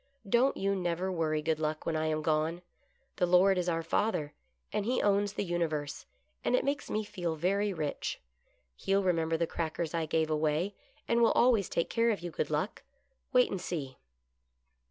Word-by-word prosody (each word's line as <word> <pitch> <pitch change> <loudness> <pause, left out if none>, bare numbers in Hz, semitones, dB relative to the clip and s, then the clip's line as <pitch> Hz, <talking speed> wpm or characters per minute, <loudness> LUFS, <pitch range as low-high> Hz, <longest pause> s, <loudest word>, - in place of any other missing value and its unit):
Don't 240 +6 +3
you 195 +1 +1
never 180 0 -1
worry. 155 -3 0
Good 160 0 0
Luck, 155 0 -2
when 165 - 0
I 155 0 0
am 155 0 -1
gone. 160 +3 0 0.5
The 180 - +2
Lord 180 +2 +5
is 180 0 0
our 165 -1 0
Father, 165 -4 0 0.4
and 210 - 0
he 245 +4 0
owns 205 0 +2
the - - -2
universe, 160 -5 -2 0.4
and - - +2
it - - +1
makes 285 +1 -1
me 215 - -1
feel 175 -5 -3
very 200 +6 +1
rich. 155 -5 -3 0.6
He'll 195 - +1
remember 165 -3 +1
the 170 - +1
crackers 160 0 -3
I 165 -1 -1
gave 160 0 +1
away, 155 +5 +1 0.3
and 235 0 +2
will 230 - +5
always 235 -6 +4
take 170 - -1
care 230 0 +3
of 210 -5 0
you. 175 0 -5
Good 150 - -2
Luck. 155 +7 -2 0.5
Wait 250 -1 +4
and 195 - -3
see." 145 -8 -5
175 Hz, 185 wpm, -31 LUFS, 155-200 Hz, 0.6 s, Lord